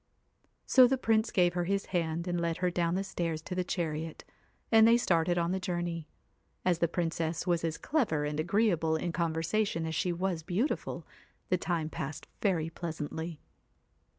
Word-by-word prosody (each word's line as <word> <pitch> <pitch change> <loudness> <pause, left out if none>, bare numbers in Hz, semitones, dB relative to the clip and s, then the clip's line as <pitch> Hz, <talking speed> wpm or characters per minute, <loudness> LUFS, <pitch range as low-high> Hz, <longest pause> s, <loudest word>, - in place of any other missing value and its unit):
So 255 -2 +7
the 265 +2 +1
Prince 225 -2 +2
gave 175 -5 +3
her 175 -1 -1
his 200 +2 0
hand 170 0 -1
and 175 -1 0
led 170 0 0
her 180 0 0
down 170 0 0
the 195 - 0
stairs 170 -4 -2
to 185 - -5
the 180 0 0
chariot; 160 -3 -3 0.5
and 225 -1 +7
they 230 +1 +6
started 175 -6 +2
on 170 0 +1
the 190 - 0
journey. 175 -3 -3 0.6
As 175 -2 +2
the 170 - +3
Princess 165 -1 -2
was 175 -2 +1
as 165 -1 -1
clever 215 - 0
and 150 +1 -2
agree 205 +7 +3
able 160 -2 +1
in 170 +2 -1
conversation 165 +2 0
as 160 - -3
she 180 +3 0
was 175 -1 -1
beautiful, 190 - -2 0.4
the 185 - +3
time 170 -4 -1
passed 150 -1 -5 0.2
very 165 -6 +1
pleasantly. 160 -1 -5
175 Hz, 180 wpm, -31 LUFS, 160-185 Hz, 0.6 s, So